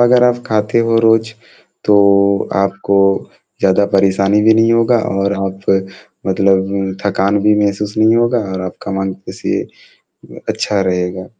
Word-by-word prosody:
अगर 120 +1 +4
आप 120 0 +1
खाते 105 +1 0
हो 115 0 +1
रोज़, 110 0 +2 0.5
तो 100 -1 +3
आपको 100 0 0 0.6
ज़्यादा 100 +1 +2
परेशानी 100 +1 +2
भी 110 0 +5
नहीं 115 +1 +3
होगा 115 +1 +2 0.2
और 100 +1 0
आप 95 0 -5 0.6
मतलब 95 0 0
थकान 100 0 +1
भी 105 0 +3
महसूस 100 +1 -3
नहीं 110 +1 +4
होगा 120 +1 +1
और 95 - -4
आपका 90 - -8
मन 95 0 -2
किसी - - -3 0.5
उ - - -16
अच्छा 105 -2 -1
रहेगा। 90 0 -3
100 Hz, 140 wpm, -15 LUFS, 95-110 Hz, 0.6 s, भी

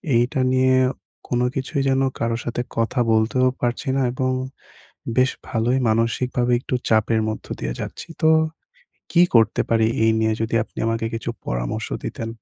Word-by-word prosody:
এইটা 120 +4 +2
নিয়ে 130 0 +4 0.5
কোনো 125 0 +1
কিছুই 135 +2 -1
যেন 135 0 +2 0.2
কারো 115 0 0
সাথে 120 0 -2 0.2
কথা 115 +3 0
বলতেও 115 +4 +2
পারছি 120 +4 -1
না - - +2
এবং 130 0 0 0.9
বেশ 130 +1 +4 0.2
ভালোই 120 +2 +1
মানসিকভাবে 120 +2 +1
একটু 130 - -4
চাপের 110 0 +3
মধ্য 110 - -5
দিয়ে 60 -1 -2
যাচ্ছি, - - -7
তো 160 - +6 0.8
কি 175 - +6
করতে 115 -2 +4
পারি? 115 -1 +3 0.2
এই 110 - +5
নিয়ে 110 0 +2
যদি 115 +1 -2
আপনি - - -14
আমাকে 115 0 0
কিছু 115 +1 -3 0.2
পরামর্শ - - -2 0.2
দিতেন। 115 - -4
120 Hz, 155 wpm, -22 LUFS, 115-130 Hz, 0.9 s, তো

